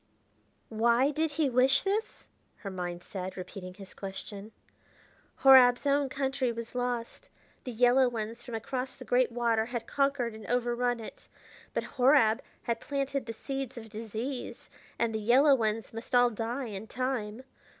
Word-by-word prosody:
"Why 235 +5 +3
did 315 +2 0
he 300 0 +1
wish 260 +1 +4
this?" 410 +3 -2 0.3
her 195 - -7
mind 175 -1 -5
said, 190 -1 -6
repeating 185 0 -8
his 195 -1 -11
question. 200 +2 -8 0.9
"Horab's 260 -1 +7
own 280 -1 +2
country 270 -2 -1
was 230 0 -7
lost; 245 - -3 0.4
the 250 - -4
yellow 245 +2 +4
ones 230 0 -5
from 240 -3 -6
across 255 +3 -4
the 255 - -11
great 245 +1 +2
water 230 -2 +1
had 240 -2 -4
conquered 275 -4 0
and 220 -1 -10
overrun 245 0 0
it. 220 - -10 0.5
But - - 0 0.2
Horab 250 -3 +5 0.2
had 235 -2 -1
planted 275 -2 -3
the 230 - -4
seeds 270 +1 -5
of 220 -2 -9
disease, 225 +4 -6 0.3
and 230 -1 0
the 220 - -1
yellow 260 +7 +5
ones 225 -3 -1
must 225 +2 -4
all 245 0 +5
die 235 +4 -3
in 210 -1 -7
time. 250 -2 -3
240 Hz, 155 wpm, -30 LUFS, 220-265 Hz, 0.9 s, Horab's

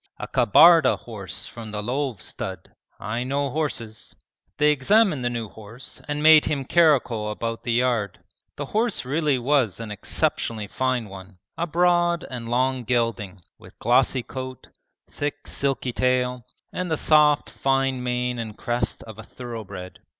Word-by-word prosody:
A - - -6
Kabarda 160 - +6
horse 100 -9 -7
from 115 -2 -9
the 105 0 -4
Lov 130 -1 -2
stud. - - -6 0.3
I 115 +4 -3
know 140 +1 -1
horses.' 120 -8 -4 0.4
They 150 +1 +4
examined 155 - +3
the 120 - +1
new 115 -2 -4
horse 110 +5 -10
and 150 0 -2
made 155 -1 +8
him 140 -3 -1
caracole 130 -10 +3
about 115 +1 -4
the 120 - -2
yard. 120 -5 0 0.4
The 145 - -4
horse 220 - 0
really 145 0 +1
was 125 -6 +1
an 115 -2 -6
exceptionally 105 +1 -2
fine 125 +2 -1
one, 95 -1 -12 0.2
a 170 - -2
broad 175 0 +2
and 120 -2 -6
long 130 +1 +1
gelding, 115 -5 -1 0.2
with - - -16
glossy 125 +2 +2
coat, 130 0 -8 0.4
thick 145 0 -5
silky 135 -3 -1
tail, 125 -1 0 0.3
and 180 -1 -3
the 160 - 0
soft 150 -1 +4
fine 135 -1 0
mane 125 0 -2
and 110 -2 -6
crest 120 -2 -2
of 110 -1 -11
a - - -8
thoroughbred. 105 -7 -8
125 Hz, 150 wpm, -24 LUFS, 115-145 Hz, 0.4 s, made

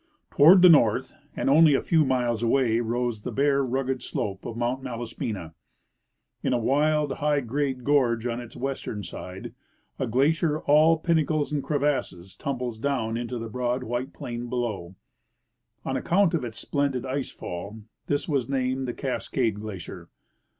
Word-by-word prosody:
Toward 175 +6 +7
the - - +10
north, 130 -4 +4 0.2
and - - -2
only 150 +1 +6
a - - +3
few 160 -2 +3
miles 125 -4 0
away, 115 -1 +2
rose 120 -1 -2
the 125 - -5
bare, 140 +3 +2
rugged 130 0 -1
slope 95 -4 -4
of 115 - -6
Mount 120 +3 -1
Malaspina. 115 -8 -5 0.9
In - - 0
a - - +3
wild, 145 +4 +1
high 145 -1 +1
grade 130 +1 -2
gorge 125 -5 +2
on 120 0 -2
its 120 - -11
western 130 -6 -4
side, 95 +7 -8 0.5
a 130 - -1
glacier, 150 +6 +1
all 155 +3 +5
pinnacles 155 -2 0
and 145 - -1
crevasses, 135 - -2
tumbles 125 -5 -4
down 120 -4 -1
into 120 +1 -3
the 115 0 -5
broad 125 +2 -2
white 120 +2 -3
j^lain 120 0 -6
below. 110 -8 -3 0.9
On 135 - -2
account 175 +7 +2
of 160 -6 0
its 115 -2 -6
splendid 135 +1 -1
ice 135 0 -2
fall 100 +5 -7 0.2
this 145 0 -1
was 135 -6 -1
named 130 -1 -1
the 120 - -4
Cascade 125 -4 -2
glacier. 105 -5 -8
125 Hz, 155 wpm, -26 LUFS, 115-145 Hz, 0.9 s, the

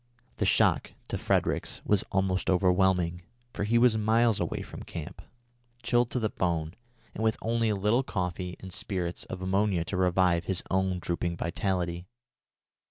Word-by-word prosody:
The - - +1
shock - - +3 0.2
to - - -2
Fredericks - - 0
was 105 -2 +2
almost 95 -1 0
overwhelming, 90 -2 +2 0.3
for 100 - -2
he 115 +3 +2
was 115 -2 +4
miles 115 +1 +3
away - - -2
from - - -9
the - - -9
camp, - - -7 0.6
chilled 120 0 +2
to 125 - -1
the 110 -2 -1
bone, 85 -3 -1 0.4
and 110 - -4
with 110 -1 +2
only 115 0 0
a 105 - +1
little 105 +6 +2
coffee 90 -5 -3
and 95 -1 -8
spirits 90 -3 -1
of 95 0 -7
ammonia 95 -2 +1
to 90 - -3
revive 90 -1 +2
his 95 -1 -2
own 95 -1 +1
drooping 85 -1 -2
vitality. 90 0 -2
95 Hz, 165 wpm, -28 LUFS, 90-105 Hz, 0.6 s, was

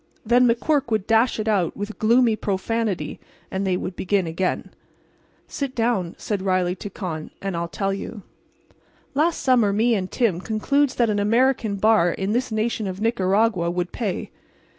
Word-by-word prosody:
Then 245 +2 +5
McQuirk 280 +4 +1
would 215 -4 0
dash 225 +2 +3
it 215 - -2
out, 195 -6 +1
with 205 +2 -6
gloomy 230 +1 +4
profanity, 210 0 -2 0.3
and 190 +1 -2
they 185 -1 +1
would 180 0 -5
begin 190 -1 0
again. 170 +3 -2 0.8
"Sit 275 -2 -4
down," 225 -7 0
said 205 -3 -3
Riley 185 -2 +1
to 205 - -6
Con, 170 -6 -5
"and 195 -2 -3
I'll 170 0 -2
tell 195 +3 -2
you. 200 +1 -6 0.9
"Last 315 +4 +2
summer 240 -6 +3
me 225 +4 +2
and 190 -4 -1
Tim 205 -9 0
concludes 260 +7 +1
that 235 -3 +2
an 205 - 0
American 230 0 +2
bar 210 -3 +4
in 195 +4 -2
this 245 +2 0
nation 220 -1 -1
of 185 0 -5
Nicaragua 200 -3 +1
would 175 0 -2
pay. 210 -7 -3
210 Hz, 165 wpm, -23 LUFS, 190-230 Hz, 0.9 s, Then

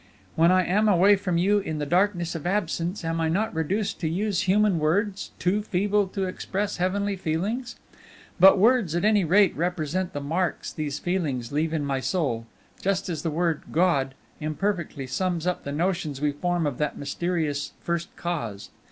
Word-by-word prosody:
"When 165 +2 +5
I 185 -1 +4
am 210 +4 +2
away 200 +2 +6
from 185 -3 -1
you 200 +4 +3
in 160 -6 -4
the 150 - -2
darkness 175 +1 +1
of 165 0 -4
absence, 180 -1 -1
am 165 0 -1
I 160 - +1
not 205 +7 0
reduced 195 +6 -1
to 160 - -1
use 190 +1 -1
human 205 -3 +3
words, 190 +6 0
too 195 +4 +1
feeble 205 0 +1
to 195 +1 -3
express 195 +2 -3
heavenly 200 +3 0
feelings? 200 +9 -2 0.6
But 195 +3 +8
words 215 -5 +3
at 175 - +1
any 210 -2 +4
rate 190 +4 +4
represent 175 +2 -2
the - - -3
marks 165 +6 -2
these 150 -3 -3
feelings 145 -10 -2
leave 155 +2 0
in 155 -3 -1
my 135 -1 -1
soul, 130 -4 -1 0.3
just 195 0 0
as 160 -4 -3
the 165 - -1
word 165 0 0
God 140 -6 +2 0.2
imperfectly 155 -2 -2
sums 170 +5 -2
up 180 -1 -2
the 140 - -3
notions 165 -2 -1
we 150 0 +1
form 175 +3 -1
of 145 -4 -2
that 150 -1 -1
mysterious 145 -1 -2
First 170 0 -2
Cause. 130 - -4
175 Hz, 180 wpm, -25 LUFS, 155-195 Hz, 0.6 s, But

